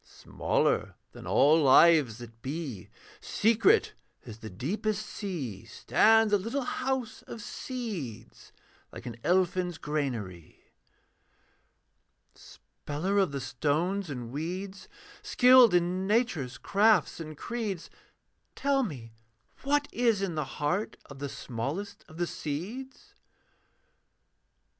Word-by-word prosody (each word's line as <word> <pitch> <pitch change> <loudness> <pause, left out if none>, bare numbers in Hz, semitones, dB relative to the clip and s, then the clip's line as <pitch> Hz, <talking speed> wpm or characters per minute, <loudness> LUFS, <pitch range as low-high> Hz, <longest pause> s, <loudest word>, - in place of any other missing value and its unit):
'Smaller - - -1 0.2
than - - -11
all 155 +3 +5
lives 145 -4 +6
that 115 -2 -12
be, 135 - -5 0.3
Secret 230 - +3 0.3
as 115 -2 -10
the 110 -2 -8
deepest 210 - -2
sea, 150 - -5
Stands 220 -1 +3
a 205 - +5
little 235 +8 -2
house 255 -2 -3
of 235 - -7
seeds, 205 - -7 0.4
Like - - -10
an 115 -1 -6
elfin's 180 -1 +1
granary, 115 - -5 1.6
'Speller 185 +8 -4
of 190 -6 +2
the 140 - -3
stones 160 +9 -1
and 120 -4 -6
weeds, 185 +7 -5 0.3
Skilled 250 -5 +6
in 180 +2 +1
Nature's 205 - 0
crafts 205 -5 +3
and 155 -2 -7
creeds, 215 -6 -4 0.6
Tell 275 0 +1
me 130 - -6 0.5
what 290 +1 +1
is 230 -5 +1
in 185 -3 -2
the 155 -2 -2
heart 165 +8 -1
Of 140 - -10
the 140 0 -4
smallest 150 - -5
of 160 - -14
the 175 - 0
seeds.' 195 - -6
175 Hz, 110 wpm, -29 LUFS, 140-215 Hz, 1.6 s, lives